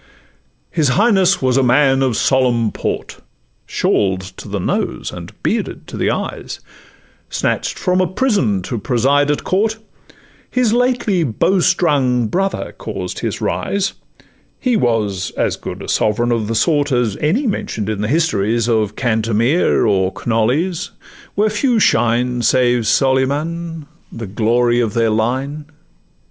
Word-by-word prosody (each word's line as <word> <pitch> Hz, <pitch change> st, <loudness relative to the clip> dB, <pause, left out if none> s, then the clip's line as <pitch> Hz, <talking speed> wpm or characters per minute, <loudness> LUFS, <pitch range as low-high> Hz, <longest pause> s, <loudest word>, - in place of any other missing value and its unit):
His 160 Hz, -4 st, +1 dB
Highness 195 Hz, -, +3 dB
was 130 Hz, 0 st, +2 dB
a -, -, +4 dB
man 135 Hz, +1 st, +3 dB
of 130 Hz, -5 st, +1 dB
solemn 120 Hz, -4 st, +2 dB
port, -, -, -4 dB, 0.5 s
Shawl'd 95 Hz, -2 st, +1 dB, 0.2 s
to -, -, -9 dB
the 100 Hz, 0 st, -3 dB
nose, -, -, -2 dB
and -, -, -9 dB
bearded -, -, -2 dB
to -, -, -7 dB
the -, -, 0 dB
eyes, -, -, -4 dB, 0.7 s
Snatch'd -, -, -1 dB
from 180 Hz, 0 st, +1 dB
a 185 Hz, -, +2 dB
prison 175 Hz, -, 0 dB
to 115 Hz, +4 st, -4 dB
preside 135 Hz, +6 st, +2 dB
at 150 Hz, -, 0 dB
court, 215 Hz, +4 st, 0 dB, 0.7 s
His 250 Hz, -3 st, +1 dB
lately 240 Hz, -7 st, +1 dB
bowstrung 145 Hz, -, +2 dB
brother 195 Hz, -, -1 dB
caused -, -, -5 dB
his -, -, -3 dB
rise; 200 Hz, -1 st, -1 dB, 0.7 s
He 250 Hz, -3 st, +1 dB
was 105 Hz, -, 0 dB
as -, -, +1 dB
good -, -, -7 dB
a -, -, -8 dB
sovereign 120 Hz, +3 st, +1 dB
of 115 Hz, -3 st, 0 dB
the 115 Hz, -, -2 dB
sort 145 Hz, +2 st, +2 dB
As 120 Hz, -5 st, +1 dB
any 195 Hz, -, +1 dB
mention'd 115 Hz, -, -2 dB
in 110 Hz, -2 st, -2 dB
the 105 Hz, -, -1 dB
histories 115 Hz, -6 st, +1 dB
Of 110 Hz, -3 st, 0 dB
Cantemir, 115 Hz, +5 st, +1 dB
or 95 Hz, -2 st, +2 dB
Knolles, 125 Hz, +10 st, 0 dB, 0.5 s
where 210 Hz, +1 st, +2 dB
few 235 Hz, +3 st, +1 dB
shine 120 Hz, -, +2 dB
Save 120 Hz, -1 st, +2 dB
Solyman, 150 Hz, +5 st, 0 dB, 0.3 s
the 115 Hz, -, -6 dB
glory 120 Hz, +4 st, +1 dB
of 115 Hz, -4 st, -1 dB
their 115 Hz, -1 st, +2 dB
line. 130 Hz, +7 st, -1 dB
130 Hz, 140 wpm, -18 LUFS, 115-170 Hz, 0.7 s, a